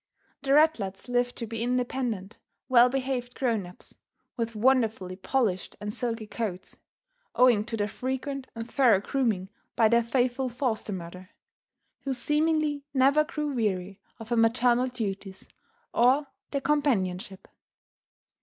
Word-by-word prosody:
The 275 0 +2
ratlets 245 -12 +2
lived 245 0 +1
to 235 - -4
be 225 0 -5
independent, 245 -4 -2 0.3
well 245 -1 +6
behaved 255 -2 -2
grown 225 -8 0
ups, 180 - -11 0.4
with 230 -2 -3
wonderfully 220 -6 +2
polished 190 -1 -1
and 210 0 -4
silky 230 -2 -3
coats, 210 -4 -5 0.6
owing 240 -3 +5
to 230 -1 -4
their 205 -1 0
frequent 265 +4 -4
and 230 0 -5
thorough 245 -6 +4
grooming 215 -5 -1 0.3
by 220 -2 +4
their 235 +1 +4
faithful 250 +2 0
foster 240 -4 -2
mother, 185 0 -7 0.7
who 275 - -3
seemingly 300 +2 +1
never 275 +3 +5
grew 300 -2 -3
weary 195 -5 -2 0.2
of 225 0 -10
her 240 - +1
maternal 240 +2 +3
duties 200 -6 -5 0.5
or 260 +5 +4 0.2
their 280 - -2
companionship. 205 -10 0
240 Hz, 130 wpm, -27 LUFS, 210-265 Hz, 0.7 s, well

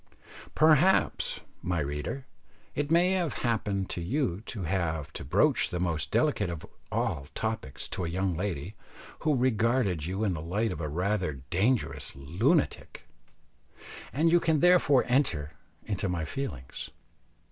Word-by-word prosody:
Perhaps, 160 +4 +4 0.2
my 90 0 -1
reader, 75 - -3 0.5
it 145 0 -2
may 175 +3 +4
have 180 -5 0
happened 105 -5 0
to 85 - -4
you 105 - -1
to 105 -6 -5
have 80 -4 -1
to - - -6
broach 70 - +3
the 90 - -3
most 85 -3 -1
delicate 140 - +1
of 85 -3 -6 0.3
all 70 0 -1
topics 110 -11 -3
to - - -3
a - - -2
young 95 +1 0
lady 90 -1 -3 0.5
who 155 -2 +2
regarded 115 - +1
you 95 +4 -2
in 100 -4 +1
the 80 - -4
light 105 +7 -1
of - - -5
a 75 - -2
rather 90 +1 0 0.2
dangerous 110 - +1
lunatic, 95 - 0 1.1
and 160 +4 +2
you 175 - +6
can 160 -3 +2
therefore 175 -6 +5
enter 120 - +1 0.3
into 100 -2 -1
my 85 -3 -1
feelings. 75 - -5
100 Hz, 145 wpm, -29 LUFS, 85-135 Hz, 1.1 s, you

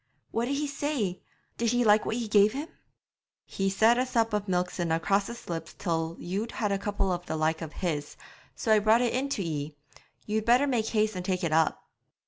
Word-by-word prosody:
'What 230 +1 0
did 275 +3 -1
he 295 +1 -1
say? 280 -10 -2 0.4
Did 235 -1 +2
he 245 0 +3
like 210 -1 +4
what - - -1
ye 235 -2 -3
gave 210 0 +5
him?' 290 +4 -5 0.8
'He 195 0 -1
said 220 +5 +4
a 255 - +2
sup 225 -3 +1
of 210 0 -1
milk 180 -1 0
sudna 165 -2 -1
cross 195 +4 +1
his 235 0 -9
lips 165 -1 -5
till 165 -3 -2
you'd 200 +6 -4
had 210 -3 -1
a 195 - 0
cupful 195 -2 -1
the 160 - -2
like 160 +1 0
of 160 -2 -6
his; 150 -5 -3 0.4
so 225 - -1
I 215 - +6
brought 220 +3 +4
it 240 -2 +1
in 270 +2 -1
to 210 -8 -1
ye. 150 -2 -4 0.5
You'd 215 0 -1
better 245 +5 +4
make 240 -6 0
haste 215 -2 +1
and 180 - -4
take 185 0 -1
it 165 -2 0
up.' 160 0 +1
205 Hz, 220 wpm, -28 LUFS, 175-235 Hz, 0.8 s, I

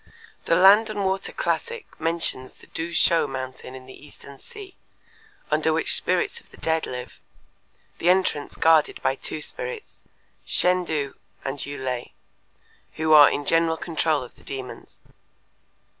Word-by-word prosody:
The 165 - +3
Land 200 +5 +6
and 205 -2 -2
Water 190 0 -1
Classic 475 -2 -2 0.2
mentions 165 -5 -2
the - - -18
Tu 165 +1 -5
Shuo 170 0 +3
mountain 130 -1 -7
in 130 0 -11
the 130 - -14
Eastern 140 -1 -14
Sea, 400 -3 -12 0.8
under 155 +1 +2
which 160 +1 +3
spirits 180 -1 0
of - - -27
the - - -17
dead 160 0 0
live, 125 0 -7 0.8
the 175 - +2
entrance 180 -6 +1
guarded 160 -2 +3
by 130 - +2
two 150 +2 -5
spirits, 480 -3 -6 0.4
Shên 180 -1 +1
Tu 145 -3 -2 0.3
and 135 +1 -3
Yü 145 +1 -5
Lei, 130 -2 -4 0.8
who 155 0 +1
are 150 -1 +9
in 145 - -3
general 165 +1 +2
control 160 -4 0
of 125 - -12
the - - -19
demons. 130 -2 -8
160 Hz, 150 wpm, -24 LUFS, 140-180 Hz, 0.8 s, are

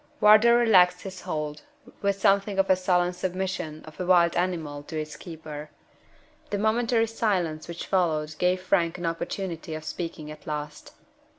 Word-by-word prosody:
Wardour 215 +3 +7
relaxed 185 -7 +5
his 190 -2 -8
hold, 150 -4 -4 0.4
with 200 -1 0
something 195 +1 +2
of 195 0 +3
the 190 - +6
sullen 180 -1 +1
submission 180 -4 -4
of 155 -1 -13
a 180 - -2
wild 175 -2 +4
animal 165 -5 -2
to 155 +2 -5
its 155 0 -6
keeper. 155 -3 -8 0.8
The 205 - -1
momentary 225 +2 +2
silence 185 -9 -1
which 170 0 -6
followed 160 -5 0
gave 180 +1 +2
Frank 180 -3 +1
an 175 - -5
opportunity 165 -1 -4
of 155 - -7
speaking 155 -1 -5
at 155 - -13
last. 150 -1 -6
180 Hz, 160 wpm, -26 LUFS, 155-195 Hz, 0.8 s, Wardour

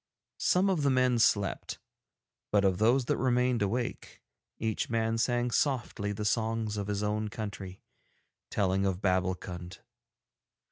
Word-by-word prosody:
Some 185 +2 +3
of 185 -5 +1
the 140 - +3
men 130 -2 +3
slept, 100 -3 +1 0.7
but 100 -1 +3
of 95 -2 +2
those 120 +4 +3
that - - 0
remained 125 -2 +2
awake 115 +5 -3 0.3
each 110 -1 -2
man 115 0 0
sang 120 +1 +1
softly 115 -6 0
the 105 +1 -4
songs 110 -1 0
of 100 -1 -3
his 105 0 -2
own 105 +1 -1
country, 100 -3 -7 0.7
telling 95 -1 +1
of 95 -2 0
Babbulkund. 90 -1 -2
110 Hz, 135 wpm, -30 LUFS, 100-120 Hz, 0.7 s, Some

